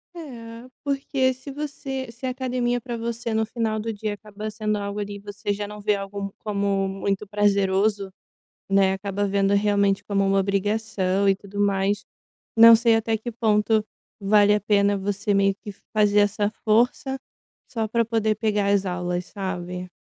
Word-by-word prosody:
É, 235 -7 -9 0.2
porque 270 -2 0
se 260 +3 -10
você 270 -3 -5
se 235 +3 -9
a - - 0
academia 250 -1 -1
para 240 -1 -5
você 230 0 -4
no 220 0 +1
final 220 -1 -2
do 225 +1 -3
dia 210 0 -3
acaba 210 +1 -7
sendo 215 0 -2
algo 200 0 -4
ali, 205 0 -5
você 205 +1 -4
já 205 0 -4
não 210 0 -9
vê 210 0 +1
algo 200 0 -5
como 200 -2 0
muito 195 +1 -2
prazeroso, 200 0 +1 0.6
né, 195 -1 +4
acaba 200 +1 -2
vendo 200 0 +2
realmente 200 -1 +2
como 200 -1 0
uma 195 0 +2
obrigação 200 -1 0
e 195 - +4
tudo 200 +1 -9
mais, 200 0 +1 0.5
não 230 0 +10
sei 230 0 +4
até 225 0 0
que 240 +3 -5
ponto 220 -1 +2 0.3
vale 205 0 +4
a 210 - +1
pena 205 0 +2
você 200 +1 -1
meio 195 0 +3
que 205 0 -9 0.2
fazer 210 -1 +4
essa 205 0 +1
força 245 +4 +2 0.5
só 225 -2 -1
para 230 +2 +1
poder 220 -1 +1
pegar 210 -2 0
as 195 -1 +2
aulas, 180 0 -2
sabe? 180 -2 -5
210 Hz, 170 wpm, -24 LUFS, 200-225 Hz, 0.6 s, não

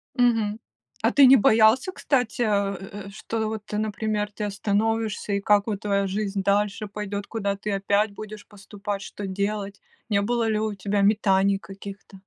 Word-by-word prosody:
Мгм. 225 -3 +2 0.4
А - - +3
ты 280 - +7
не 260 +1 +9
боялся, 220 - +4
кстати, 250 -10 -1
э, - - +2 0.6
э, - - -8
что 220 +2 -3
вот, 220 -1 -5
например, 210 0 -2
ты 210 0 -4
остановишься, 210 +1 -1
и 200 - 0
как 205 0 +3
вот 210 -1 -3
твоя 200 -1 +1
жизнь 195 0 -2
дальше 205 +1 +1
пойдет, 205 0 -5
куда 200 -3 -2
ты 210 +1 -4
опять 200 +2 +1
будешь 215 0 -9
поступать, 205 0 -6
что 200 0 -7
делать? 200 +1 -3 0.3
Не 200 -1 +2
было 235 +2 0
ли 215 -1 +1
у 215 -1 -1
тебя 200 +1 -1
метаний 200 -1 +3
каких-то? 195 0 -11
210 Hz, 165 wpm, -25 LUFS, 200-220 Hz, 0.6 s, не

